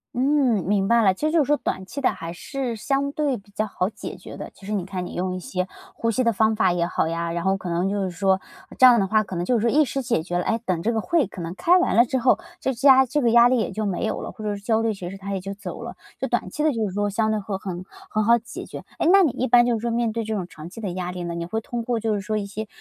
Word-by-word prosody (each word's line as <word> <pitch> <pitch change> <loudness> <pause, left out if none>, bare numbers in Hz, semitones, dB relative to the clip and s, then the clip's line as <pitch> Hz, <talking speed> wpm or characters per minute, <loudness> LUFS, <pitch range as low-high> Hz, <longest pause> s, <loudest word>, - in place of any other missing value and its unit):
嗯， 260 -5 +2
明 195 0 +1
白 235 +1 +4
了。 200 -3 +5
其 300 - -3
实 310 - +2
就 330 - +3
是 - - -6
说 295 +1 +3
短 190 - -3
期 280 - -6
的 270 - +2
还 165 0 -7
是 240 - -4
相 275 +5 -1
对 290 -3 0
比 200 -2 -12
较 210 +2 -2
好 195 -2 -2
解 - - -8
决 - - -10
的。 - - -7
其 - - -21
实 - - -4
你 200 -4 -1
看 185 -1 -4
你 - - -9
用 185 +1 -1
一 - - -4
些 185 0 -3 0.3
呼 230 - 0
吸 255 +3 +1
的 230 - +3
方 220 +1 +2
法 190 -4 +3
也 175 -1 +1
好 170 - 0
呀， 170 +1 -2
然 170 0 -3
后 190 +1 +2
可 185 - -8
能 175 +2 0
就 200 0 -1
是 185 - -2
说， 190 +2 +2 0.4
这 260 - +7
样 245 -2 +8
的 195 - +1
话， 215 +2 +3
可 190 -2 -7
能 175 - -1
就 235 +5 +2
是 230 - +1
说 235 - +1
一 305 - +6
时 270 0 -3
解 235 -9 0
决 175 +2 -3
了。 175 - 0
诶， 225 - 0
等 180 -3 0
这 230 - +1
个 220 - 0
会 335 +6 +2
可 190 -2 -9
能 170 +1 -5
开 355 - +4
完 360 - +1
了 235 - +6
之 260 +1 -1
后， 250 +1 +4 0.2
这 265 - 0
家 265 +1 +6
这 290 +4 0
个 235 -3 +3
压 235 +1 +7
力 255 +1 +2
也 225 - -1
就 215 -1 -2
没 190 - -1
有 - - -2
了， - - -6
或 220 - -10
者 205 -1 -1
说 200 - -9
焦 220 +1 +2
虑 225 -1 +1
其 185 -3 -7
实 195 - -8
它 200 +1 -5
也 195 - -1
就 195 +2 -6
走 200 - -7
了。 - - -7 0.2
就 - - -1
短 - - -1
期 300 - -4
的 310 - +4
就 225 -4 -1
是 190 - -6
说 205 +1 0
相 220 +2 +1
对 215 - 0
会 200 -1 -4
很 185 -2 -6 0.3
很 215 0 +1
好 235 +2 +5
解 230 0 -8
决。 - - -8 0.2
诶， - - +2
那 390 0 +7
你 310 - +3
一 255 - -2
般 240 0 +6
就 240 - +2
是 225 - -1
说 235 - -1
面 230 -1 0
对 230 +1 -2
这 220 0 -3
种 190 -4 -2
长 160 -2 -10
期 210 - -11
的 210 -4 -3
压 180 0 -4
力 180 -1 -5
呢， 170 0 -4
你 170 0 -3
会 220 +5 -2
通 235 +1 -4
过 235 0 -1
就 220 -1 0
是 205 - -1
说 215 +3 -2
一 205 - -2
些 215 +2 -6
215 Hz, 360 characters per minute, -23 LUFS, 190-240 Hz, 0.4 s, 样